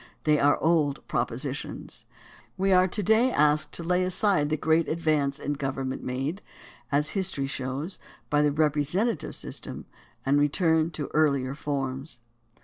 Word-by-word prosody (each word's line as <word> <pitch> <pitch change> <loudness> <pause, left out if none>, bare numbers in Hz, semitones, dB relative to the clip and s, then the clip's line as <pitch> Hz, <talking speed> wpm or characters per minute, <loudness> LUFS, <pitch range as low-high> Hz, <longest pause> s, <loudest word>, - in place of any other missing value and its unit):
They 150 -1 +3
are 145 +1 +4
old 155 -4 +1
propositions. 130 +4 -4 0.5
We 195 +1 +1
are 185 0 +5
to 205 +3 -3
day 220 +6 +4
asked 150 -2 +2
to 170 - -3
lay 180 +2 +1
aside 185 -4 +2
the 155 - 0
great 160 +2 +2
advance 155 -4 0
in 145 - -3
government 135 -2 -3
made, 135 +9 -3 0.5
as 145 +2 +1
history 190 -8 0
shows, 135 +6 -4 0.3
by 145 0 +2
the 150 -1 +3
representative 155 +7 0
system - - -7 0.4
and 140 +2 +3
return 160 +2 +2
to 150 -4 -5
earlier 140 -4 +2
forms. 135 -2 -4
150 Hz, 145 wpm, -27 LUFS, 140-170 Hz, 0.5 s, are